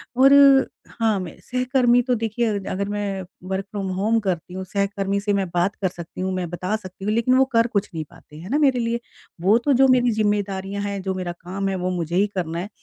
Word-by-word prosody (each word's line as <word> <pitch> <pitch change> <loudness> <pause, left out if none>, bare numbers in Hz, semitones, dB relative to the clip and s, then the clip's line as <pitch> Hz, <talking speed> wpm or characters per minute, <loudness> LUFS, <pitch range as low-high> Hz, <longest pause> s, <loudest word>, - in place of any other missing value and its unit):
और 270 +2 +6 0.6
हाँ, 220 -3 0
मैं 180 -3 -7
सहकर्मी 250 -1 +2
तो 250 0 0
देखिए 225 +1 -1 0.2
अगर 200 +1 -2
मैं 205 -2 -2 0.3
वर्क 190 0 -2
फ़्रॉम-होम 200 +2 0
करती 180 -4 -3
हूँ, 190 +1 -4
सहकर्मी 200 +1 -1
से 205 +1 -1
मैं 195 -1 0
बात 175 +4 +1
कर 195 - -1
सकती 175 0 -8
हूँ, 190 0 -1
मैं 180 -2 -3
बता 180 +4 -2
सकती 190 -2 -8
हूँ 210 - +1
लेकिन 235 +3 +2
वो 265 - +5
कर 230 0 +4
कुछ 205 -3 -1
नहीं 160 -1 -3
पाते। 165 -3 -18
है 175 +4 -9
ना? 280 - +1
मेरे 275 -4 +3
लिए 230 0 -1 0.4
वो 200 +5 +5
तो 275 +4 +1
जो 265 +1 +5
मेरी 250 -2 +4
ज़िम्मेदारियाँ 200 -2 -1
हैं, 200 -1 -3
जो 190 0 -2
मेरा 180 -2 -3
काम 195 +3 -3
है 190 - -1
वो 185 0 -2
मुझे 170 -2 -3
ही 200 +3 +3
करना 170 -2 -2
है, 190 +4 -5
200 Hz, 225 wpm, -22 LUFS, 185-230 Hz, 0.6 s, और